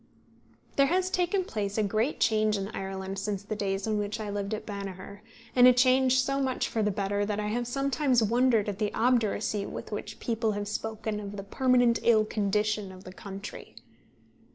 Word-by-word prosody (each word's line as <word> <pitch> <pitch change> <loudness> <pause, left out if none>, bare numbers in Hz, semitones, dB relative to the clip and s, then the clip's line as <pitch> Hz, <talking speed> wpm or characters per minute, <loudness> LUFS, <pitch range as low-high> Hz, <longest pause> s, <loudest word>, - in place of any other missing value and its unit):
There 275 0 +5
has 370 +4 +1
taken 365 +2 +1
place 205 - -3
a 215 - +2
great 215 +7 0
change 215 -1 +2
in 195 0 -4
Ireland 190 -1 -5
since 200 0 -3
the 215 +1 -4
days 195 -1 -2
in 215 -1 0
which 205 +1 -3
I 210 -1 -4
lived 205 +1 -2
at 215 - -8
Banagher, 200 -1 -7 0.4
and 250 0 +8
a 250 - +8
change 255 +1 +4
so 275 +1 -1
much 260 -2 0
for 225 - -1
the 210 - +2
better, 200 0 -1
that 205 0 -2
I 210 0 -2
have 240 +2 -2
sometimes 275 -1 +1
wondered 230 -1 +3
at 200 -2 -4
the 210 -2 0
obduracy 220 -4 +1
with - - -7
which 210 0 -6
people 225 -2 -1
have 205 0 -3
spoken 220 0 -3
of 205 0 -7
the 195 - -5
permanent 245 +2 +3
ill 220 -2 +4
condition 210 -1 -1
of 185 0 -12
the 185 - -10
country. 200 +1 -9
215 Hz, 195 wpm, -28 LUFS, 200-245 Hz, 0.4 s, and